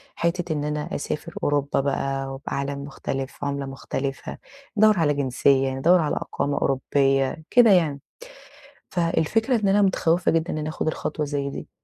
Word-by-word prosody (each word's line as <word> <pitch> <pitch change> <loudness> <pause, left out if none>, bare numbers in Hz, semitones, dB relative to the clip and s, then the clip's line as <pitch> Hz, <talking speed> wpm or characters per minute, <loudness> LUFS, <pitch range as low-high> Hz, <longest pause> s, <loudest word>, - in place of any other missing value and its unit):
حِتّة 170 0 -1
إن 145 -1 -2
أنا 150 0 -3
أسافر 160 +3 -4
أوروبا 145 -1 +1
بقى 135 -1 -2
وعالم 140 0 -3
مختلف، 135 -1 -5
عُملة 140 -1 -2
مختلفة، 135 0 -5 0.4
ندوّر 215 -2 +5
على 150 -3 +3
جنسية، 135 0 +2
ندوّر 170 +7 +4
على 150 - -1
إقامة 145 0 -2
أوروبية 135 +2 +1
كده 240 -3 +6
يعني، 160 -7 +3 0.9
فالفكرة 190 - +1
إن 200 - +2
أنا 205 +1 +4
متخوّفة 180 -2 +2
جدًا 165 +1 0
إنّي 150 - -3
آخد 155 - -3
الخطوة 155 -1 -2
زي 140 -1 -2
دي، - - -7
145 Hz, 145 wpm, -24 LUFS, 140-170 Hz, 0.9 s, كده